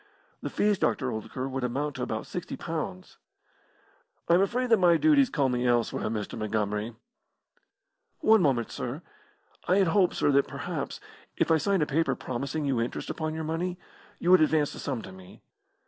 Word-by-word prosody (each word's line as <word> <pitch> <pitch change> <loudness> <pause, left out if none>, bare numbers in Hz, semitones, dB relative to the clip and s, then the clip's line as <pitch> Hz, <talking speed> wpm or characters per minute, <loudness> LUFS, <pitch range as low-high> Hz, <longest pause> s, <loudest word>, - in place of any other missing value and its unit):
"The - - -3
fees, 205 -2 +1
Dr. 130 -3 0
Oldacre, 130 +4 -4
would 135 -1 -4
amount 140 +4 -2
to - - -5
about - - -3
sixty - - -6
pounds." 90 0 -5 1.1
"I - - +4
am 175 - +5
afraid 245 +6 0
that 225 - +6
my 175 -2 +5
duties 285 - +4
call 140 -4 +1
me 125 -1 0
elsewhere, 120 -1 +1
Mr. 105 -2 -4
Montgomery." 110 +1 -2 1.3
"One 220 -1 +5
moment, 130 -8 +1
sir! 130 +7 -5 0.6
I 180 - +4
had 195 -4 +3
hoped, 185 0 +3
sir, 145 - +2
that 140 0 +3
perhaps, - - -5 0.4
if - - +1
I 160 - +6
signed 195 +1 +1
a - - +1
paper 160 +3 +1
promising 140 +4 -3
you 130 -4 +1
interest 120 - -3
upon 155 -1 -3
your 160 - -3
money, 170 +3 -2 0.4
you 175 - +1
would 185 -3 +7
advance 155 -1 +2
this - - -8
sum 130 -5 -3
to - - -9
me. 95 -1 -14
145 Hz, 180 wpm, -28 LUFS, 120-175 Hz, 1.3 s, would